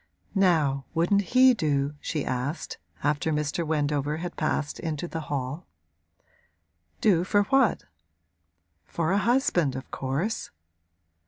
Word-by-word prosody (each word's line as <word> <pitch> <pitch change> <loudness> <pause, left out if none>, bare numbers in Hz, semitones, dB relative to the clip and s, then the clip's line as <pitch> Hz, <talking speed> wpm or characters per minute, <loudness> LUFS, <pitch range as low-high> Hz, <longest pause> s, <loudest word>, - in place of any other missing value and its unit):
'Now, 155 -9 +2
wouldn't 175 +5 +3 0.2
he 260 0 +8
do?' 145 - 0
she 150 -2 -3
asked, 130 +5 -3 0.2
after 150 +2 +1
Mr. 150 +2 -1
Wendover 150 -1 0
had 175 +2 -5
passed 155 -1 -1
into 160 0 -3
the 165 - -4
hall. 140 +4 -3 1.3
'Do 180 -6 +4
for 205 +2 +3
what?' 270 0 +2 1.0
'For 165 0 -2
a 200 - +3
husband, 205 - +2
of 130 - -7
course.' 140 +12 -2
155 Hz, 115 wpm, -26 LUFS, 145-185 Hz, 1.3 s, he